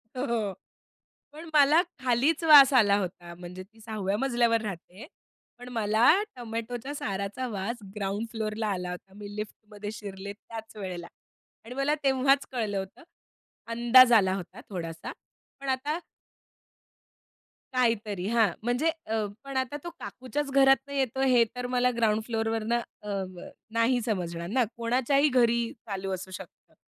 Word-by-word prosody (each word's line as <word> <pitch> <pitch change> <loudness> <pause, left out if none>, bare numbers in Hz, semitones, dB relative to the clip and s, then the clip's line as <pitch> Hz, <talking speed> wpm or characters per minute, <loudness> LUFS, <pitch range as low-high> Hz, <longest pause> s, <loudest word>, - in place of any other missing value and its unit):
हो. 235 -6 -1 0.8
पण 320 +2 -10
मला 300 +3 +6 0.2
खालीच 260 +6 +2
वास 290 -4 +9
आला 205 -5 +5
होता 175 -3 -5
म्हणजे 180 +1 -8
ती 220 +3 -23
6व्या 210 -3 -2
मजल्यावर 235 -3 +2
राहते. 195 - -7 0.5
पण 245 0 -10
मला 220 +1 +3 0.3
टोमॅटोच्या 240 +3 -5
साराचा 200 +4 -3
वास 215 +2 -3 0.2
ग्राउंड 205 +2 -2
फ्लोरला 215 -1 -2
आला 180 -3 -2
होता. 190 +2 -9
मी 205 0 -9
लिफ्टमध्ये 210 0 -7
शिरले 200 -1 -7
त्याच 225 +1 -10
वेळेला. 180 -4 -6 0.6
आणि 245 - -8
मला 275 +3 +1
तेव्हाच 270 +1 +3
कळलं 215 -5 -2
होतं 190 - -8 0.7
अंदाज 240 +2 +7
आला 190 -4 +5
होता 180 -3 -8
थोडासा 165 -4 -5 0.5
पण 275 -1 -5
आता 285 +5 0 1.8
काहीतरी 215 -6 0
हां 230 -2 +4 0.2
म्हणजे 245 +7 +1 0.2
अ, 220 -1 -1 0.2
पण 275 -1 -5
आता 260 +3 -1
तो 345 - -4
काकूच्याच 255 +7 -4
घरातनं 270 +1 +4
येतो 265 -1 0
हे 250 -3 +5
तर 250 0 -4
मला 250 0 +3
ग्राउंड 220 -2 +2
फ्लोरवरनं 225 0 0 0.2
अ, 200 -2 -3
ब 175 - -9 0.3
नाही 245 +2 +3
समजणार 175 -6 -3
ना 250 +2 +3
कोणाच्याही 260 +5 +2
घरी 235 -2 +3
चालू 195 -4 -5
असू 190 +1 -6
शकतं. 185 - -11
230 Hz, 140 wpm, -28 LUFS, 200-255 Hz, 1.8 s, वास